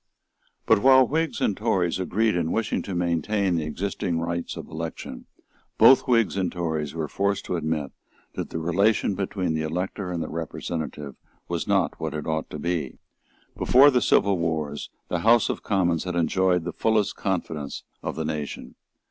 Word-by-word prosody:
But, -, -, +4 dB
while 130 Hz, 0 st, +6 dB
Whigs 160 Hz, +4 st, -1 dB
and 100 Hz, -, +2 dB
Tories 95 Hz, -5 st, 0 dB
agreed 105 Hz, +3 st, +1 dB
in 85 Hz, -2 st, 0 dB
wishing 115 Hz, -1 st, 0 dB
to 95 Hz, -, -5 dB
maintain 90 Hz, +3 st, 0 dB
the 80 Hz, -2 st, 0 dB
existing 85 Hz, +1 st, -2 dB
rights 85 Hz, +1 st, -3 dB
of -, -, -7 dB
election, 80 Hz, +1 st, -7 dB, 0.5 s
both 130 Hz, -, +7 dB
Whigs 115 Hz, -5 st, +3 dB
and 95 Hz, -3 st, 0 dB
Tories 80 Hz, -4 st, -3 dB
were 80 Hz, -2 st, -2 dB
forced 100 Hz, +5 st, -1 dB
to -, -, -2 dB
admit 80 Hz, -3 st, -2 dB, 0.4 s
that -, -, -4 dB
the -, -, -4 dB
relation 100 Hz, +6 st, +2 dB
between 95 Hz, -3 st, -2 dB
the 80 Hz, -, -1 dB
elector 90 Hz, +4 st, -3 dB
and 85 Hz, -2 st, -2 dB
the -, -, -5 dB
representative 80 Hz, -2 st, -5 dB, 0.3 s
was -, -, -3 dB
not -, -, +1 dB
what 80 Hz, -1 st, -3 dB
it 75 Hz, -, -4 dB
ought 80 Hz, 0 st, -2 dB
to -, -, -6 dB
be. 80 Hz, -4 st, -2 dB, 0.6 s
Before 140 Hz, +3 st, +6 dB
the 125 Hz, -2 st, +2 dB
civil 100 Hz, -5 st, +3 dB
wars 80 Hz, -3 st, -2 dB, 0.2 s
the -, -, 0 dB
House 115 Hz, 0 st, +4 dB
of -, -, -3 dB
Commons 90 Hz, -5 st, +1 dB
had 90 Hz, -1 st, -3 dB
enjoyed 90 Hz, +1 st, +2 dB
the 90 Hz, -, -4 dB
fullest 110 Hz, -2 st, +1 dB
confidence 80 Hz, -7 st, -3 dB, 0.2 s
of -, -, -4 dB
the 80 Hz, -, -3 dB
nation. 75 Hz, -2 st, -5 dB
85 Hz, 175 wpm, -25 LUFS, 80-100 Hz, 0.6 s, both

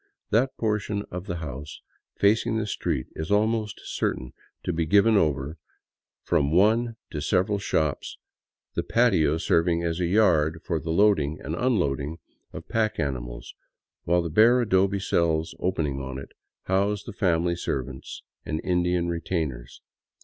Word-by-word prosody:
That 125 Hz, +5 st, +2 dB
portion 105 Hz, -2 st, -1 dB
of 90 Hz, +2 st, -6 dB
the 90 Hz, -, -2 dB
house 75 Hz, -3 st, -7 dB, 0.4 s
facing 110 Hz, +2 st, +2 dB
the 110 Hz, -, -1 dB
street 65 Hz, -10 st, -2 dB
is 80 Hz, 0 st, -5 dB
almost 110 Hz, +1 st, +1 dB
certain 65 Hz, -, -3 dB, 0.3 s
to 90 Hz, -, -1 dB
be 80 Hz, -1 st, -1 dB
given 105 Hz, +5 st, +5 dB
over 70 Hz, -6 st, +1 dB
to -, -, -18 dB, 0.7 s
from 70 Hz, +1 st, +1 dB
one 110 Hz, +6 st, +3 dB, 0.2 s
to 75 Hz, -, -4 dB
several 95 Hz, +5 st, +1 dB
shops, 80 Hz, -7 st, -1 dB, 0.6 s
the -, -, 0 dB
patio 95 Hz, -11 st, +2 dB
serving 85 Hz, +1 st, +1 dB
as 85 Hz, 0 st, -1 dB
a 90 Hz, -, +1 dB
yard 85 Hz, -6 st, +3 dB
for 85 Hz, -3 st, -1 dB
the 80 Hz, -, -7 dB
loading 80 Hz, -5 st, +3 dB
and 75 Hz, -, -5 dB
unloading 80 Hz, -, 0 dB, 0.3 s
of -, -, -9 dB
pack 110 Hz, -1 st, 0 dB
animals, -, -, -4 dB, 0.5 s
while 85 Hz, +1 st, +2 dB
the 85 Hz, -, -4 dB
bare 115 Hz, +8 st, +6 dB
adobe 100 Hz, -3 st, +2 dB
cells 80 Hz, -4 st, 0 dB
opening 75 Hz, -7 st, -1 dB
on 65 Hz, 0 st, -5 dB
it 70 Hz, -, -9 dB, 0.3 s
house 100 Hz, +2 st, 0 dB
the 115 Hz, -, -8 dB
family 85 Hz, -3 st, +1 dB
servants 65 Hz, -6 st, -5 dB, 0.2 s
and 80 Hz, -, -3 dB
Indian 90 Hz, -1 st, +1 dB
retainers. 80 Hz, -7 st, -3 dB
85 Hz, 150 wpm, -26 LUFS, 75-105 Hz, 0.7 s, bare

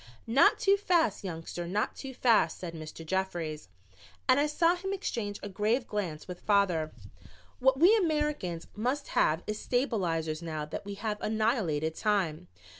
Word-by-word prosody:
"Not 235 Hz, +5 st, +5 dB
too 395 Hz, 0 st, +4 dB
fast, 345 Hz, -, +1 dB
youngster, 170 Hz, -1 st, -5 dB
not 205 Hz, +4 st, -1 dB
too 265 Hz, -2 st, -8 dB
fast," 235 Hz, -3 st, +3 dB
said 175 Hz, -2 st, -6 dB
Mr. 160 Hz, 0 st, -8 dB
Jeffries, 165 Hz, -, -2 dB, 0.6 s
and 255 Hz, +2 st, +5 dB
I 295 Hz, -, +3 dB
saw 335 Hz, +3 st, +3 dB
him 385 Hz, +2 st, -4 dB
exchange 210 Hz, -, -3 dB
a -, -, -3 dB
grave 215 Hz, +5 st, 0 dB
glance 185 Hz, -9 st, -4 dB
with 180 Hz, -1 st, -8 dB
father. 180 Hz, -7 st, +2 dB, 0.7 s
"What 265 Hz, +1 st, +3 dB
we 365 Hz, +8 st, +7 dB
Americans 300 Hz, -, -1 dB
must 255 Hz, +7 st, -2 dB
have 160 Hz, +3 st, +2 dB
is 215 Hz, 0 st, -3 dB
stabilizers 175 Hz, -, -1 dB
now 155 Hz, -2 st, -4 dB
that 150 Hz, -, -6 dB
we 200 Hz, 0 st, -5 dB
have 210 Hz, 0 st, -3 dB
annihilated 215 Hz, -, 0 dB
time. 185 Hz, -, 0 dB
205 Hz, 155 wpm, -30 LUFS, 165-260 Hz, 0.7 s, we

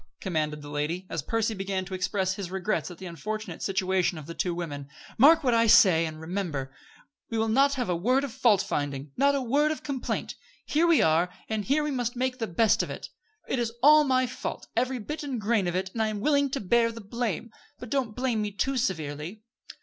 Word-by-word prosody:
commanded 150 Hz, -5 st, -2 dB
the -, -, -9 dB
lady, 150 Hz, +5 st, -2 dB
as 165 Hz, -, -2 dB
Percy 225 Hz, -, -1 dB
began 190 Hz, -1 st, -3 dB
to 190 Hz, -, -8 dB
express 185 Hz, +1 st, 0 dB
his 190 Hz, -2 st, -5 dB
regrets 190 Hz, +3 st, -2 dB
at 175 Hz, -, -10 dB
the 190 Hz, -, -9 dB
unfortunate 185 Hz, +2 st, -5 dB
situation 190 Hz, -2 st, 0 dB
of 155 Hz, -, -8 dB
the 170 Hz, -, -7 dB
two 175 Hz, 0 st, -1 dB
women, 145 Hz, -5 st, -5 dB, 0.3 s
"Mark 315 Hz, +5 st, +7 dB
what 250 Hz, -3 st, +2 dB
I 230 Hz, 0 st, +4 dB
say, 170 Hz, -6 st, +6 dB
and 155 Hz, 0 st, -8 dB
remember, 160 Hz, -6 st, -4 dB, 0.6 s
we 230 Hz, -, -2 dB
will 220 Hz, -, +2 dB
have 220 Hz, -, 0 dB
not 275 Hz, +2 st, +4 dB
a 180 Hz, -, 0 dB
word 250 Hz, +10 st, +2 dB
of 275 Hz, -5 st, -4 dB
fault 235 Hz, -7 st, +3 dB
finding, 140 Hz, -1 st, -3 dB
not 280 Hz, +1 st, +3 dB
a 275 Hz, -, -1 dB
word 285 Hz, +5 st, +2 dB
of 310 Hz, -, -5 dB
complaint. 275 Hz, -3 st, -3 dB, 0.3 s
Here 325 Hz, +3 st, +2 dB
we 335 Hz, -2 st, +5 dB
are, 160 Hz, +3 st, +3 dB, 0.2 s
and 215 Hz, -2 st, -2 dB
here 295 Hz, +3 st, +2 dB
we 300 Hz, -, -1 dB
must 245 Hz, -2 st, -2 dB
make 255 Hz, +1 st, -1 dB
the 225 Hz, -, -1 dB
best 205 Hz, +5 st, +3 dB
of -, -, -4 dB
it. -, -, -7 dB, 0.4 s
It 260 Hz, -, -1 dB
is 230 Hz, -1 st, -1 dB
all 305 Hz, +1 st, +8 dB
my 255 Hz, -2 st, +2 dB
fault, 255 Hz, +1 st, -5 dB
every 255 Hz, +2 st, +1 dB
bit 295 Hz, +7 st, -5 dB
and 275 Hz, -5 st, -3 dB
grain 210 Hz, -2 st, +1 dB
of 175 Hz, -, -2 dB
it, 190 Hz, +1 st, -2 dB
and 225 Hz, -, -2 dB
I 220 Hz, -, +2 dB
am 215 Hz, -1 st, -3 dB
willing 285 Hz, +3 st, +2 dB
to 275 Hz, -, -2 dB
bear 230 Hz, +4 st, +2 dB
the 230 Hz, -, -9 dB
blame; 230 Hz, 0 st, -3 dB, 0.3 s
but 245 Hz, -, -10 dB
don't 255 Hz, -6 st, -1 dB
blame 250 Hz, -4 st, 0 dB
me 210 Hz, -, -1 dB
too 265 Hz, +6 st, -1 dB
severely." 170 Hz, -, -3 dB
215 Hz, 225 wpm, -27 LUFS, 175-255 Hz, 0.6 s, all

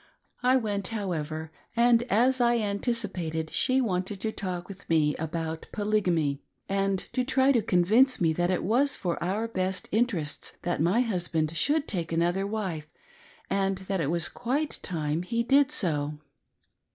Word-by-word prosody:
I 255 Hz, +1 st, +4 dB
went, 205 Hz, -5 st, -2 dB
how 205 Hz, -4 st, -3 dB
ever, 155 Hz, 0 st, -4 dB, 0.2 s
and, 235 Hz, 0 st, +5 dB
as 250 Hz, +5 st, +3 dB
I 240 Hz, 0 st, +4 dB
anticipated, 200 Hz, -7 st, -2 dB
she 260 Hz, 0 st, +2 dB
wanted 190 Hz, -3 st, -2 dB
to 220 Hz, -, -1 dB
talk 180 Hz, -4 st, -4 dB
with 200 Hz, 0 st, -12 dB
me 155 Hz, -2 st, +3 dB
about 160 Hz, 0 st, -4 dB
Polygamy, 180 Hz, -9 st, 0 dB, 0.3 s
and 195 Hz, 0 st, +1 dB, 0.2 s
to 255 Hz, -, +1 dB
try 265 Hz, +2 st, +3 dB
to 240 Hz, -4 st, +3 dB
convince 215 Hz, +7 st, +3 dB
me 165 Hz, -2 st, +2 dB
that 175 Hz, +2 st, 0 dB
it 185 Hz, -, 0 dB
was 260 Hz, +7 st, +2 dB
for 175 Hz, -2 st, -2 dB
our 205 Hz, +6 st, -1 dB
best 190 Hz, -3 st, -2 dB
interests 195 Hz, -10 st, -1 dB
that 175 Hz, -3 st, -1 dB
my 185 Hz, +9 st, +3 dB
husband 170 Hz, -8 st, -1 dB
should 295 Hz, -, +1 dB
take 170 Hz, -5 st, -3 dB
another 175 Hz, +4 st, +1 dB
wife, 190 Hz, -8 st, -3 dB, 0.6 s
and 195 Hz, -1 st, 0 dB
that 190 Hz, -2 st, -1 dB
it 145 Hz, -, 0 dB
was 170 Hz, -1 st, +1 dB
quite 275 Hz, +5 st, -2 dB
time 155 Hz, -2 st, -2 dB
he 230 Hz, +6 st, -1 dB
did 275 Hz, +3 st, +4 dB
so. 150 Hz, -, 0 dB
195 Hz, 160 wpm, -28 LUFS, 165-230 Hz, 0.6 s, and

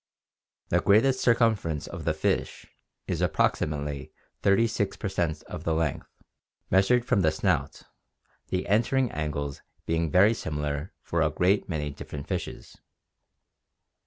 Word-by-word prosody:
The -, -, +3 dB
greatest 130 Hz, +6 st, +4 dB
circumference 110 Hz, -, +2 dB
of 85 Hz, -3 st, -8 dB
the 80 Hz, -, +2 dB
fish -, -, -1 dB, 0.4 s
is -, -, -2 dB
approximately 75 Hz, -2 st, 0 dB, 0.3 s
36 100 Hz, 0 st, +2 dB
per -, -, -3 dB
cent 85 Hz, -5 st, -1 dB
of -, -, -8 dB
the 80 Hz, -, 0 dB
length, 80 Hz, -3 st, -1 dB, 0.6 s
measured 115 Hz, +6 st, +4 dB
from 100 Hz, -, +2 dB
the 80 Hz, -, +4 dB
snout, 80 Hz, -, -1 dB, 0.6 s
the 90 Hz, 0 st, -2 dB
"entering 120 Hz, +4 st, +2 dB
angles" 75 Hz, -2 st, -3 dB, 0.2 s
being 80 Hz, 0 st, 0 dB
very 100 Hz, +8 st, +5 dB
similar 75 Hz, -3 st, -3 dB
for 85 Hz, -, -1 dB
a 80 Hz, -, +3 dB
great 90 Hz, +6 st, +1 dB
many 75 Hz, -3 st, -2 dB
different 70 Hz, 0 st, -8 dB
fishes. -, -, -5 dB
85 Hz, 130 wpm, -27 LUFS, 75-105 Hz, 0.6 s, very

